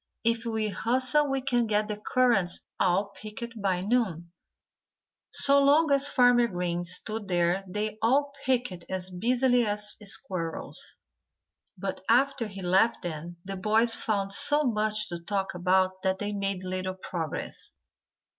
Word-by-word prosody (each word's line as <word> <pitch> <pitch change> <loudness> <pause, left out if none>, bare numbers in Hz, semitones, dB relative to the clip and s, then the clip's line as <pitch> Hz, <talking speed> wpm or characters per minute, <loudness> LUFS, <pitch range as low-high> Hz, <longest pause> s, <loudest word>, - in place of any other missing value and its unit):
If 230 +1 0
we 220 -1 -1
hustle 255 +7 +1
we 270 0 -1
can 245 -3 +1
get 210 0 +1
the 210 - -3
currants 210 -4 +1 0.2
all 190 +3 +2
picked 225 +2 -8
by 185 -3 0
noon." 190 -6 -1 1.0
So 280 0 +4
long 295 +2 +4
as 280 0 +4
Farmer 245 -2 +4
Green 175 -3 -2
stood 210 +4 -3
there 175 +1 +1
they 210 +3 -3
all 280 +5 +2
picked 245 -9 -1
as 185 0 -4
busily 245 +6 +2
as 210 -1 -1
squirrels. 180 -4 -4 0.8
But 195 +1 -4
after 250 0 +2
he 195 -2 -9
left 190 +6 +2
them 170 0 -6
the 195 0 -5
boys 220 +4 +3
found 200 -3 0
so 295 +7 +6
much 215 -3 0
to 170 -1 -5
talk 195 +3 -3
about 185 +1 +1
that 190 0 0
they 205 +1 -3
made 195 -2 -3
little 185 0 -3
progress. 170 -4 -4
210 Hz, 145 wpm, -27 LUFS, 185-240 Hz, 1.0 s, so